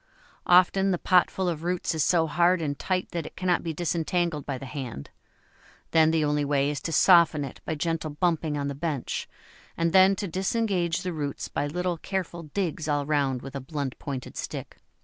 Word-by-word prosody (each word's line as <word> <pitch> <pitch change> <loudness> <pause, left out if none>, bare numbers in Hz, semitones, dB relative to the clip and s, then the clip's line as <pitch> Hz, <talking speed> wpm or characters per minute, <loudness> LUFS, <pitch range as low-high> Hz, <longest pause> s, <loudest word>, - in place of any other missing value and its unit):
Often 185 +2 +5
the 180 - +1
potful 185 +1 +2
of 165 -3 -2
roots 175 0 -1
is 160 -3 +1
so 170 -2 +3
hard 175 +4 +3
and 145 -3 -3
tight 185 -1 -1
that 170 -3 -3
it - - -12
cannot 180 -1 +1
be 165 - -3
disentangled 170 -1 -1
by 140 -2 -2
the 135 - -8
hand; 130 - -7 0.8
then 160 -1 +5
the 160 -1 +2
only 150 0 +1
way 140 0 +1
is 145 -2 -4
to 165 - -4
soften 165 -4 +5
it 135 - -10
by 160 - -2
gentle 165 0 -2
bumping 155 -1 0
on 140 0 -2
the 140 - -3
bench, 145 -2 -3 0.5
and 165 0 +1
then 190 +1 +6
to 200 +1 -4
disengage 185 -2 0
the 180 -1 -3
roots 145 -3 -4
by 145 - -2
little 180 +3 -2
careful 180 -3 -4
digs 160 -1 -3
all 145 -1 0
round 140 -4 0
with 135 +1 -8
a 140 - -3
blunt 140 -1 -4
pointed 135 -3 -6
stick. - - -6
160 Hz, 195 wpm, -26 LUFS, 145-180 Hz, 0.8 s, then